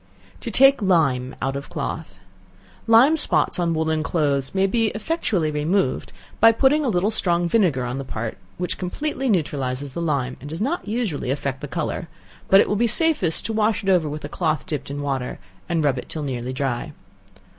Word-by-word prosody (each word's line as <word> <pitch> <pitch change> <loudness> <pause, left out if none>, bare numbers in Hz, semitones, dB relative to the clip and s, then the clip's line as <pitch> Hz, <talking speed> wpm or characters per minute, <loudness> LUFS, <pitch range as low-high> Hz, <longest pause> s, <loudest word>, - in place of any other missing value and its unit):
To - - -5
Take 270 -1 +5
Lime 140 -10 +2
out 135 +1 -1
of 140 +1 -6
Cloth. - - -5 0.7
Lime 235 +7 +6
spots 305 - +2
on 170 -2 +1
woollen 160 0 0
clothes 145 -3 0
may 190 0 +3
be 225 +3 +1
effectually 215 - -1
removed, 150 0 0 0.3
by 225 +1 +8
putting 280 +6 +3
a 265 - +1
little 195 +1 +1
strong 175 -4 +1
vinegar 170 - +2
on 125 +2 -3
the - - -4
part, 115 -4 -5 0.2
which 180 +1 -3
completely 270 +8 -2
neutralizes 140 - -1
the 170 - -4
lime, 140 -6 -1
and 145 - -8
does 160 - -5
not 270 - -2
usually 210 - -2
effect 135 -1 -2
the 145 - -5
color; 165 +2 -3 0.4
but 195 - +7
it - - +4
will 210 - 0
be 235 +3 +2
safest 235 - +2
to 225 - -2
wash 220 0 +1
it 195 - -1
over 175 -5 +3
with 150 0 -6
a - - -3
cloth 155 0 -1
dipped 155 -7 -4
in 145 +1 -4
water, 135 -3 -3 0.3
and 165 -2 +1
rub 135 -3 +1
it - - -10
till 155 - -4
nearly 125 -2 -3
dry. 135 +3 -3
165 Hz, 195 wpm, -22 LUFS, 140-210 Hz, 0.7 s, by